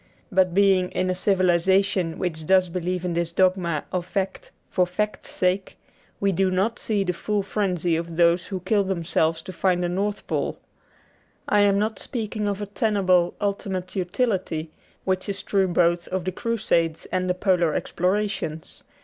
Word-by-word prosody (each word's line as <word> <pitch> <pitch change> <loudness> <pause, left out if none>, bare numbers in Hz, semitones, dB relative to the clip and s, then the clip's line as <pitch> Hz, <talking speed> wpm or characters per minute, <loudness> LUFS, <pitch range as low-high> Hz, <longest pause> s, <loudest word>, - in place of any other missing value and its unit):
But 185 -2 +2
being 190 -2 +4
in 185 0 0
a - - +1
civilization 185 -1 +2
which 160 -4 -3
does 185 -1 +4
believe 180 +1 -2
in 175 - -1
this 170 0 -1
dogma 180 -3 +1
of 180 -1 -1
fact 190 +1 -3 0.2
for 180 -1 +1
fact's 210 +4 -3
sake, 185 +1 -1 0.4
we 200 0 +2
do 190 +1 +2
not 195 +6 0
see 210 -3 0
the 180 -1 -1
full 205 +3 -1
frenzy 180 -5 0
of 165 0 -4
those 170 0 +3
who 190 -2 -4
kill 205 +2 +2
themselves 165 -3 0
to 185 - -8
find 180 0 +1
the 175 - 0
North 200 +3 -2
Pole. - - -2 0.9
I 210 - +3
am 200 -1 +4
not 215 0 -1
speaking 215 -3 -3
of 200 0 -2
a - - -2
tenable 195 -5 +2
ultimate 195 -2 -3
utility, 185 -5 -1 0.3
which 185 +1 -1
is 200 -1 -2
true 195 -2 +2
both 175 -1 +2
of 185 -1 -3
the 185 - -1
Crusades 170 -7 0
and 185 0 0
the 180 - +1
polar 180 -4 +2
explorations. 180 -4 -2
185 Hz, 165 wpm, -24 LUFS, 175-200 Hz, 0.9 s, being